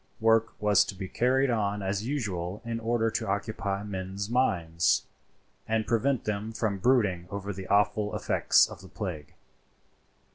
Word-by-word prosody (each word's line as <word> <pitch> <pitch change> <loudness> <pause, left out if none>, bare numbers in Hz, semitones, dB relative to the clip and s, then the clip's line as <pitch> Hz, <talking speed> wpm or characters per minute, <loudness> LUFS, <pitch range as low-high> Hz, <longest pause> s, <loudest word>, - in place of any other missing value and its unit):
Work 115 0 +2
was 105 -2 +4
to 100 - -6
be 95 0 -5
carried 130 +5 +2
on 105 -3 -1
as 100 +3 -2
usual 100 -7 -3
in 115 -1 -3
order 115 0 0
to - - -2
occupy 100 0 -2
men's 100 +1 -5
minds, 85 -10 +2 0.6
and 110 0 0
prevent 120 +3 +1
them 105 +1 -3
from 105 -3 -1
brooding 105 -7 +2
over 100 0 -4
the 95 0 -8
awful 105 +1 +2
effects - - +3
of - - -11
the 95 - -12
plague. 85 -9 -6
105 Hz, 150 wpm, -28 LUFS, 95-115 Hz, 0.6 s, was